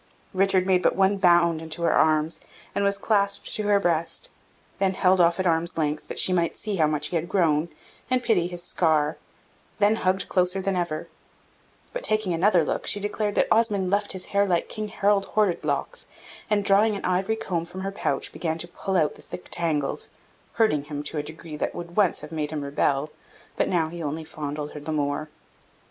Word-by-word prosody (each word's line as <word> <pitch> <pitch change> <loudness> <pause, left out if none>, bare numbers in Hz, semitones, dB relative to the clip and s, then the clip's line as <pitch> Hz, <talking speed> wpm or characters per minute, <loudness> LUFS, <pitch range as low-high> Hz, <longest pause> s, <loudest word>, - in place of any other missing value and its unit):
Richard 190 -1 +3
made 185 -1 +3
but - - +2
one 195 +1 +3
bound 170 -3 +4
into 160 +1 -5
her - - +3
arms, 155 +1 +2 0.3
and 200 - 0
was 200 0 +1
clasped 200 -1 0
to 215 - -1
her 205 -1 +4
breast; 170 - -1 0.5
then 190 -1 +1
held 185 -1 +4
off 170 +1 +3
at 185 - 0
arm's 165 0 +1
length, 150 -1 -1
that - - -6
she 185 - +3
might 170 -2 0
see 210 -2 -3
how 155 -3 +4
much 150 0 0
he 175 - -4
was 165 - -6
grown, 165 -4 +2 0.4
and 255 -1 +1
pity 195 -8 +2
his 175 -1 -7
scar; 155 -4 +1 0.6
then 210 +1 +3
hugged 185 -1 +1
closer 180 +1 +1
than 190 0 -1
ever: 170 -3 -2 0.9
but, - - -3
taking 215 - +2
another 175 0 +3
look, - - -2
she 205 - +2
declared 205 0 -2
that - - +3
Osmond 210 -5 +2
left 205 +1 +1
his 185 -1 -5
hair 200 0 +4
like 175 -2 0
King 215 -1 -4
Harald 200 -1 +1
Horrid 210 -5 +1
locks; - - -3 0.4
and, 205 -1 +1
drawing 205 +2 +4
an 200 - -5
ivory 185 +4 +1
comb 170 -6 -3
from 185 +2 -7
her 195 +1 -3
pouch, 140 -8 -2
began 160 -2 -2
to 175 - -3
pull 190 +2 -2
out 155 -3 +2
the - - -15
thick 180 - -10
tangles, 155 -5 0 0.4
hurting 150 -11 +2
him 145 0 -5
to 150 +1 0
a - - 0
degree 155 +1 -8
that - - -2
would 175 0 -7
once 200 -5 +2
have 150 +1 -9
made 155 -2 -2
him 150 -2 -4
rebel, 140 +1 0 0.4
but - - 0
now 170 -3 +1
he 170 +1 -7
only 155 +1 -3
fondled 150 -1 -5
her 150 - -7
the 150 +2 -5
more. 145 0 -1
175 Hz, 205 wpm, -25 LUFS, 155-200 Hz, 0.9 s, bound